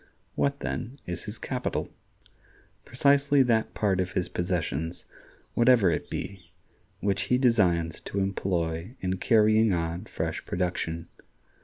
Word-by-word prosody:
What, 140 Hz, 0 st, 0 dB
then, 130 Hz, +5 st, -4 dB
is 90 Hz, -1 st, -5 dB
his -, -, -6 dB
capital? -, -, -3 dB, 0.9 s
Precisely 140 Hz, +2 st, +4 dB
that 115 Hz, -3 st, +1 dB
part 100 Hz, -3 st, +1 dB
of 90 Hz, 0 st, -1 dB
his 90 Hz, -, -1 dB
possessions, 85 Hz, -2 st, -2 dB, 0.5 s
whatever 120 Hz, -6 st, +5 dB
it -, -, -3 dB
be, 95 Hz, -3 st, -6 dB, 0.5 s
which 100 Hz, -1 st, +1 dB
he 125 Hz, -, +4 dB
designs 90 Hz, -10 st, +2 dB
to -, -, -6 dB
employ 95 Hz, 0 st, -1 dB
in 95 Hz, 0 st, -1 dB
carrying 110 Hz, 0 st, +4 dB
on 85 Hz, +3 st, -2 dB
fresh 80 Hz, -5 st, -3 dB
production. 85 Hz, -2 st, -2 dB
95 Hz, 125 wpm, -27 LUFS, 85-115 Hz, 0.9 s, whatever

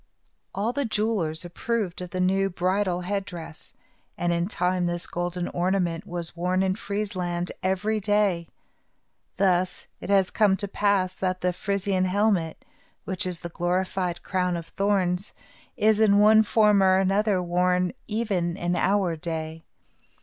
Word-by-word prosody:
All 215 Hz, +5 st, -1 dB
the 285 Hz, -, 0 dB
jewelers 210 Hz, -, -1 dB
approved 190 Hz, 0 st, -2 dB
of 180 Hz, -, -6 dB
the 185 Hz, -, -4 dB
new 195 Hz, +2 st, +2 dB
bridal 185 Hz, 0 st, 0 dB
head 195 Hz, +2 st, -2 dB
dress, 165 Hz, -4 st, -9 dB, 0.4 s
and 175 Hz, 0 st, 0 dB
in 170 Hz, +1 st, 0 dB
time 180 Hz, -2 st, 0 dB
this 175 Hz, 0 st, -2 dB
golden 175 Hz, 0 st, -3 dB
ornament 175 Hz, -2 st, -1 dB
was 170 Hz, -1 st, -5 dB
worn 180 Hz, +2 st, 0 dB
in 190 Hz, -1 st, +1 dB
Friesland 190 Hz, -4 st, -3 dB
every 200 Hz, +4 st, 0 dB
day. 200 Hz, -4 st, +1 dB, 0.9 s
Thus 185 Hz, -1 st, +1 dB
it -, -, -8 dB
has 195 Hz, -2 st, +3 dB
come 205 Hz, -3 st, +3 dB
to 200 Hz, -, -3 dB
pass 200 Hz, -2 st, +1 dB
that 185 Hz, -1 st, -2 dB
the 180 Hz, 0 st, +1 dB
Frisian 195 Hz, 0 st, 0 dB
helmet, 185 Hz, -4 st, 0 dB, 0.4 s
which 185 Hz, -1 st, -2 dB
is 175 Hz, -3 st, -5 dB
the 170 Hz, -, -5 dB
glorified 180 Hz, +1 st, -1 dB
crown 180 Hz, -2 st, 0 dB
of 165 Hz, -1 st, -8 dB
thorns, 195 Hz, -1 st, 0 dB, 0.4 s
is, 215 Hz, 0 st, +3 dB
in 205 Hz, -2 st, +5 dB
one 215 Hz, +1 st, +7 dB
form 210 Hz, -2 st, +4 dB
or 190 Hz, -1 st, +5 dB
another, 195 Hz, +1 st, +2 dB
worn 180 Hz, +1 st, +1 dB
even 195 Hz, -6 st, -1 dB
in 175 Hz, -1 st, -1 dB
our 190 Hz, -2 st, +1 dB
day. 160 Hz, -1 st, -5 dB
185 Hz, 150 wpm, -25 LUFS, 175-200 Hz, 0.9 s, one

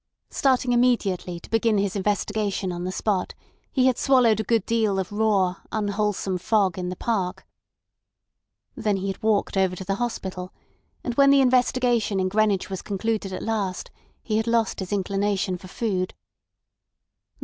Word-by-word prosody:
Starting 260 Hz, -2 st, +2 dB
immediately 205 Hz, -8 st, +1 dB
to -, -, -13 dB
begin 225 Hz, -1 st, +2 dB
his 200 Hz, 0 st, 0 dB
investigation 205 Hz, -1 st, -1 dB
on 175 Hz, 0 st, -4 dB
the 185 Hz, -, -2 dB
spot, 190 Hz, -1 st, -1 dB, 0.4 s
he 255 Hz, -2 st, +2 dB
had 255 Hz, -2 st, +2 dB
swallowed 245 Hz, -6 st, +4 dB
a -, -, 0 dB
good 225 Hz, -1 st, +1 dB
deal 220 Hz, -4 st, +1 dB
of 190 Hz, 0 st, -2 dB
raw, 205 Hz, -4 st, +1 dB
unwholesome 205 Hz, -3 st, -1 dB
fog 195 Hz, -1 st, +2 dB
in 180 Hz, 0 st, -3 dB
the 180 Hz, -, -4 dB
park. 190 Hz, -3 st, -2 dB, 1.3 s
Then 210 Hz, -3 st, 0 dB
he 195 Hz, +1 st, -3 dB
had 195 Hz, -, -5 dB
walked 215 Hz, -2 st, +1 dB
over 190 Hz, -1 st, +2 dB
to 190 Hz, -, -7 dB
the 195 Hz, -, 0 dB
hospital; 185 Hz, -6 st, -4 dB, 0.5 s
and 245 Hz, -, -2 dB
when 275 Hz, 0 st, +6 dB
the 280 Hz, 0 st, +6 dB
investigation 245 Hz, -4 st, +2 dB
in 185 Hz, 0 st, +1 dB
Greenwich 205 Hz, -1 st, +1 dB
was 190 Hz, -1 st, -5 dB
concluded 205 Hz, 0 st, -2 dB
at 185 Hz, -, -5 dB
last 205 Hz, -5 st, -2 dB, 0.3 s
he 215 Hz, -2 st, 0 dB
had 220 Hz, +1 st, -1 dB
lost 230 Hz, -2 st, +1 dB
his 190 Hz, 0 st, -5 dB
inclination 200 Hz, -1 st, 0 dB
for 185 Hz, +1 st, -10 dB
food. 185 Hz, -2 st, -2 dB
205 Hz, 160 wpm, -24 LUFS, 190-225 Hz, 1.3 s, when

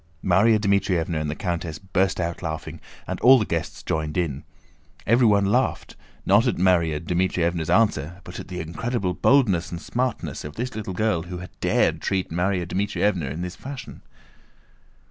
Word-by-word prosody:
Márya 100 Hz, +5 st, +5 dB
Dmítrievna 95 Hz, -5 st, +1 dB
and 75 Hz, -, -2 dB
the 75 Hz, -, -3 dB
countess 85 Hz, -4 st, -3 dB
burst 95 Hz, 0 st, 0 dB
out 85 Hz, -1 st, -2 dB
laughing, 80 Hz, -2 st, -5 dB, 0.2 s
and -, -, -4 dB
all 130 Hz, +2 st, +8 dB
the 110 Hz, -, 0 dB
guests 85 Hz, -2 st, -4 dB
joined 75 Hz, 0 st, -2 dB
in. 75 Hz, -6 st, -1 dB, 0.6 s
Everyone 110 Hz, -3 st, +4 dB
laughed, 100 Hz, -, 0 dB, 0.3 s
not 105 Hz, +6 st, +4 dB
at 125 Hz, -, +1 dB
Márya 85 Hz, -4 st, +2 dB
Dmítrievna's 85 Hz, -1 st, 0 dB
answer 90 Hz, -6 st, +2 dB
but -, -, -8 dB
at -, -, -8 dB
the 90 Hz, -1 st, -6 dB
incredible 95 Hz, +4 st, -2 dB
boldness 100 Hz, -5 st, +3 dB
and 85 Hz, -, -4 dB
smartness 125 Hz, +5 st, -3 dB
of 75 Hz, 0 st, -8 dB
this 125 Hz, +3 st, -4 dB
little 100 Hz, -4 st, -5 dB
girl 110 Hz, -4 st, +1 dB
who 90 Hz, +2 st, -7 dB
had 90 Hz, +1 st, -9 dB
dared -, -, +1 dB
to -, -, -5 dB
treat 95 Hz, -3 st, -1 dB
Márya 90 Hz, +1 st, 0 dB
Dmítrievna 95 Hz, -4 st, 0 dB
in 80 Hz, +6 st, -4 dB
this 90 Hz, 0 st, -5 dB
fashion. 135 Hz, -1 st, -9 dB
90 Hz, 165 wpm, -24 LUFS, 85-105 Hz, 0.6 s, all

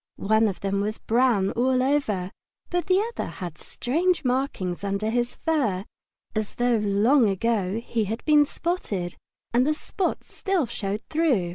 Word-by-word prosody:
One 220 Hz, +2 st, +3 dB
of 195 Hz, -, -4 dB
them 200 Hz, 0 st, 0 dB
was 215 Hz, +2 st, -2 dB
brown 230 Hz, -5 st, +2 dB
all 255 Hz, +1 st, +2 dB
over, 225 Hz, -10 st, 0 dB, 0.4 s
but 355 Hz, 0 st, 0 dB
the 375 Hz, 0 st, +4 dB
other -, -, -3 dB
had 175 Hz, -4 st, -7 dB
strange 335 Hz, +5 st, 0 dB
markings 245 Hz, -9 st, -1 dB
under 200 Hz, +2 st, -1 dB
his 240 Hz, +1 st, 0 dB
fur, 230 Hz, -, 0 dB, 0.5 s
as 215 Hz, -1 st, -3 dB
though 245 Hz, -1 st, +2 dB
long 210 Hz, +4 st, +3 dB
ago 205 Hz, 0 st, 0 dB
he 225 Hz, -2 st, 0 dB
had 220 Hz, +4 st, -4 dB
been 300 Hz, -1 st, +6 dB
spotted, 215 Hz, -, -3 dB, 0.4 s
and 245 Hz, +1 st, +4 dB
the 305 Hz, -, +2 dB
spots 370 Hz, +4 st, -3 dB
still 385 Hz, -7 st, 0 dB
showed 205 Hz, -2 st, -4 dB
through. 280 Hz, -, +2 dB
230 Hz, 155 wpm, -25 LUFS, 200-280 Hz, 0.5 s, been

